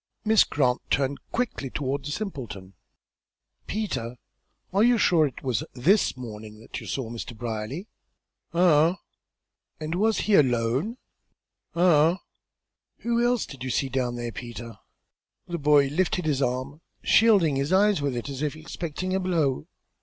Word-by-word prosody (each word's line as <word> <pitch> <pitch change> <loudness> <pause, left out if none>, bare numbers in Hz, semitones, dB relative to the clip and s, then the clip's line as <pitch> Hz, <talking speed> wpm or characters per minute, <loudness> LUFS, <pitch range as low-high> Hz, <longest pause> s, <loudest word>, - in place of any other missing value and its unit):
Miss 220 -1 +6
Grant 130 -4 +1
turned 140 0 0
quickly 230 - -2
toward 140 +1 -2
the - - -4
simpleton. 120 - -6 0.9
"Peter, 125 - -3 0.6
you 230 +5 +5
are - - 0
sure 165 -7 +4
it 135 - -10
was 130 -4 0
this 160 - +2
morning 110 -3 -9
that 115 - -8
you - - -9
saw 125 -4 -3
Mr. 120 0 -7
Brierly?" 120 - -4 0.6
"Uh 170 -1 +4
hum." - - -14 0.8
"And, 155 +1 -4
was 215 +5 +2
he 215 - 0
alone?" 130 - +2 0.8
"Uh 170 -2 +5
hum." - - -15 0.8
"Who 235 0 +1
else 240 -2 +2
did 135 -3 -10
you 130 - -3
see 135 +2 0
down 125 -2 -1
there, 120 -1 -4
Peter?" 120 -2 -8 0.7
The 175 -1 -4
boy 145 -1 +5
lifted 180 +3 0
his 145 -3 +1
arm, 130 +4 -2 0.2
shielding 200 -11 +4
his 140 +4 -1
eyes 200 -2 +4
with 140 -3 -1
it 120 - -4
as 135 -1 -5
if 150 -1 -1
expecting 165 +3 -5
a 190 - +1
blow. 165 -8 0
145 Hz, 155 wpm, -26 LUFS, 125-185 Hz, 0.9 s, Miss